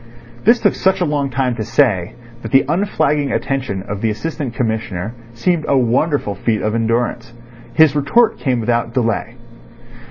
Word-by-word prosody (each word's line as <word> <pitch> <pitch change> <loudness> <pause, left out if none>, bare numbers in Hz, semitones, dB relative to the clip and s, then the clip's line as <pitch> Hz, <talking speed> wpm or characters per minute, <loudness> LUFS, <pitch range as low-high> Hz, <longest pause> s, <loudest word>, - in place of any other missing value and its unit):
This 235 +3 +5
took 205 - +2
such 190 0 +1
a 180 - +1
long 145 -3 -1
time 125 -1 -1
to 110 - -2
say 115 -6 +1 0.3
that - - -7
the 135 0 +5
unflagging 150 -5 0
attention 130 -9 -2
of 105 0 -6
the 115 - +1
Assistant 135 +2 -4
Commissioner 110 -4 -2 0.2
seemed 165 +7 0
a 140 - +3
wonderful 130 -1 +1
feat 110 +1 -1
of 110 - 0
endurance. 115 +1 -1 0.4
His 155 -3 +5
retort 180 +12 +2
came 130 -4 0
without 115 0 -1
delay. 115 -4 -1
125 Hz, 160 wpm, -18 LUFS, 115-150 Hz, 0.4 s, This